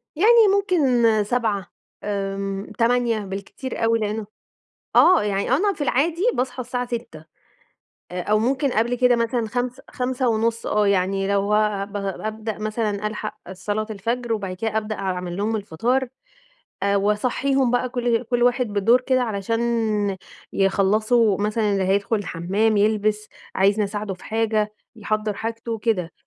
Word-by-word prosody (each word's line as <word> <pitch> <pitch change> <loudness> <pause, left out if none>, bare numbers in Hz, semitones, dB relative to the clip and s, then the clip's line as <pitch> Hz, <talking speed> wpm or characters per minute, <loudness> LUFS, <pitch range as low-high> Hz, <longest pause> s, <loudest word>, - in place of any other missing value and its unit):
يعني 445 +6 +6
ممكن 255 - +3
07:00 210 -4 -1 0.4
آمم، 195 -1 -3
08:00 235 -1 +2
بالكتير 200 +6 -6
أوي 230 0 +3
لإنّه 215 0 -2 0.7
آه 370 - +7
يعني 200 0 -1
أنا 395 +10 +3
في 360 - -14
العادي 315 +7 +1
باصحى 250 0 -2
الساعة 250 0 -3
06:00 235 -10 -6 0.9
آآ، 180 0 -3
أو 210 +3 +2
ممكن 260 +4 +1
قبل 235 +2 +1
كده 250 0 +4
مثلًا 230 0 0
خمس 245 +2 -3
خمسة 255 0 -1
ونُص 230 +1 0
آه، 210 -1 +2
يعني 195 0 +1
لو 200 +1 +1
آآ 210 -2 +1
ب 200 - -17
بابدأ 215 +2 -4
مثلًا 215 -1 -2
ألحق 215 0 -5 0.2
صلاة 205 +3 -3
الفجر 230 +3 -2
وبعد 195 -4 -3
كده 220 +3 -2
أبدأ 215 0 -2
أعمل 180 -2 -3
لهم 215 +3 0
الفطار 230 +7 -1 0.8
آآ، 200 0 +2
وأصحيهم 245 +6 +1
بقى 245 +1 +1
كُل 240 -2 0
كُل 240 +1 0
واحد 245 +1 +3
بالدور 215 +4 +3
كده 255 0 +1
علشان 225 0 -2 0.9
يخلّصوا 205 +2 +2
مثلًا 210 0 +1
اللي 195 -1 +1
هيدخل 200 +4 +1
الحمّام، 205 +3 0
يلبس، 210 0 +1 0.3
عايزني 200 +2 +3
أساعده 205 -1 -4
في 185 - -16
حاجة، 215 -1 0 0.2
يحضّر 215 0 -2
حاجته 225 +1 -4
كده، 200 -7 -1
215 Hz, 145 wpm, -23 LUFS, 200-245 Hz, 0.9 s, آه